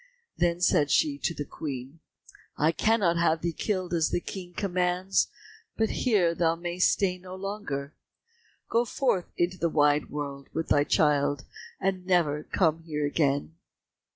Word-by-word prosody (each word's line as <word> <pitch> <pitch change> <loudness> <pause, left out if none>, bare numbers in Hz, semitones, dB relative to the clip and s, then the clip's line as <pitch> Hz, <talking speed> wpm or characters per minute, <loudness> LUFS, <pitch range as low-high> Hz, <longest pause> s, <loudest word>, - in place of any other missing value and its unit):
Then 175 0 +1
said 145 -4 +3
she 290 -2 +2
to 170 - -1
the 145 - -4
Queen, 135 +1 -6 0.6
"I 155 +2 +3
cannot 195 -2 +2
have 165 -1 +2
thee 170 -1 0
killed 185 -1 -2
as 165 -2 +2
the - - 0
King 180 0 -7
commands, 180 0 +1 0.5
but 220 0 +1
here 200 -9 +2
thou 165 -1 +1
mayst 175 +1 +1
stay 185 -2 0
no 185 0 -9
longer. 190 -8 -5 0.7
Go 230 +1 +2
forth 240 -6 -1
into 175 +1 0
the 170 - +1
wide 145 -1 +2
world 140 -2 -5
with 160 0 -2
thy 145 0 +4
child, 145 -3 +2 0.3
and 190 -1 -1
never 170 -5 +2
come 165 -3 +1
here 150 -3 -2
again." 145 0 0
170 Hz, 155 wpm, -27 LUFS, 150-185 Hz, 0.7 s, thy